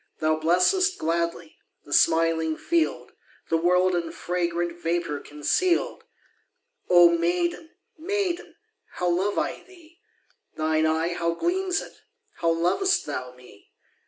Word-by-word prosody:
Thou 155 0 +2
blessest 185 - +2
gladly 170 0 -2 0.3
The 145 - -7
smiling 160 -1 +3
field, 335 -1 -1 0.4
The 165 - +4
world 180 +2 +2
in 170 -2 -2
fragrant 175 -1 -3
Vapour 165 -3 -1
conceal'd. 340 - -1 0.8
Oh 175 -1 +7
maiden, 175 - -1 0.3
maiden, 375 0 -2 0.4
How 180 - -2
love 190 +4 0
I - - -2
thee! 345 -2 -19 0.6
Thine 155 0 +1
eye, 160 +2 0
how 170 -1 -1
gleams 370 - 0
it! - - -11 0.4
How 170 - 0
lov'st 180 - +1
thou 125 0 -5
me! 125 -5 -18
170 Hz, 120 wpm, -25 LUFS, -, 0.8 s, Oh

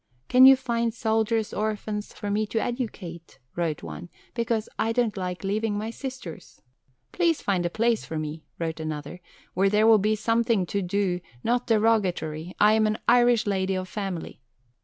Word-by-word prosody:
"Can 255 +1 +8
you 270 - +9
find 235 -3 -1
soldiers' 220 -1 0
orphans 210 0 -3
for 205 -1 -5
me 215 +1 0
to 225 +1 -1
educate," 205 - -5 0.2
wrote 165 -4 -2
one, 80 +1 -8 0.2
"because 230 -2 -1
I 225 - +1
don't 235 -3 +1
like 180 -1 -4
leaving 205 +2 -1
my 220 +2 -3
sisters?" 255 - -8 0.5
"Please 340 -3 +1
find 180 -3 +1
a - - -4
place 230 +4 +1
for 160 - -5
me," 155 +1 -5
wrote 165 -1 -3
another, 155 +2 -5 0.3
"where 195 +2 +3
there 210 +2 +3
will 225 -1 +7
be 215 +2 +2
something 230 -2 +1
to 200 +3 -2
do 180 -1 -1 0.2
not 245 +1 0
derogatory. 190 -7 +1
I 210 +1 +6
am 220 0 +3
an 215 0 0
Irish 240 -1 +4
lady 190 -2 0
of 185 0 -3
family." 190 -8 -5
210 Hz, 170 wpm, -26 LUFS, 180-230 Hz, 0.5 s, you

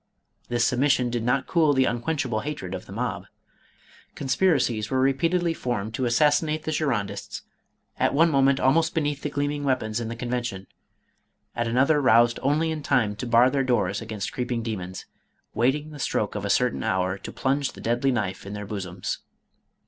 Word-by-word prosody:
This 120 -1 +1
submission 130 -1 +2
did 120 -1 -2
not 125 +3 +1
cool 160 -4 +3
the 130 -1 +3
unquenchable 120 -1 -1
hatred 110 -8 -5
of 95 - -6
the - - -11
mob. - - -3 0.9
Conspiracies 130 - +1
were 130 - 0
repeatedly 165 +6 +2
formed 115 -7 -3
to 130 +2 -1
assassinate 150 +5 +2
the 155 - -2
Girondists, 135 -10 -2 0.6
at - - +3
one 165 +4 +4
moment 135 -1 +3
almost 160 +5 +2
beneath 145 -3 -1
the 150 - -2
gleaming 145 +1 -2
weapons 120 -5 0
in 115 - -4
the 115 - -5
Convention, 120 -5 -3 0.9
at 120 -1 -1
another 135 +6 +3
roused 120 -2 +4
only 150 +4 +1
in 155 -1 -4
time 120 -8 +1
to 125 - -4
bar 120 +2 +5
their 135 -1 +1
doors 110 -6 0
against 110 -1 -5
creeping 125 -3 -2
demons, 95 -5 -5 0.5
waiting 135 +7 0
the 150 - -10
stroke 105 -5 -1
of 105 -1 -4
a - - -2
certain 125 +4 +1
hour 95 0 0
to - - -8
plunge 135 +1 -1
the - - -12
deadly 120 +4 0
knife 100 -6 -2
in 100 - -7
their 105 0 -5
bosoms. 95 -3 -4
125 Hz, 175 wpm, -25 LUFS, 110-145 Hz, 0.9 s, bar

